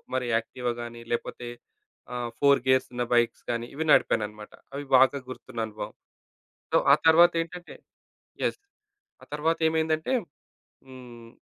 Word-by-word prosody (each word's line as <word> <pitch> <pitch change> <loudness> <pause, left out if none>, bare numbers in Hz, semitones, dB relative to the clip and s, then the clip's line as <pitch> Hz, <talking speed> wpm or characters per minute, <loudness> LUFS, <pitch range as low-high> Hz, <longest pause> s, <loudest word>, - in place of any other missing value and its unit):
మరి 130 - 0
యాక్టివా 120 +2 -3
గాని, 120 0 -9
లేకపోతే 120 0 -4 0.7
ఆహ్, 120 -1 -3
4 140 -1 +5
గేర్సున్న 130 -1 +1
బైక్స్ 120 -1 +2
గాని 120 0 -1
ఇవి 155 - -2
నడిపానన్నమాట. 105 -1 +1 0.2
అవి 145 - -4
బాగా 130 +2 +6
గుర్తున్ననుభవం. 115 -4 -6 0.8
సో, - - +5
ఆ - - +10
తరువాతేంటంటే 170 +1 +3 0.7
యెస్. - - -1 0.6
ఆ - - -11
తరువాతేమైందంటే 160 - +1 0.8
హ్మ్. 120 -3 -12
130 Hz, 110 wpm, -27 LUFS, 120-160 Hz, 0.8 s, ఆ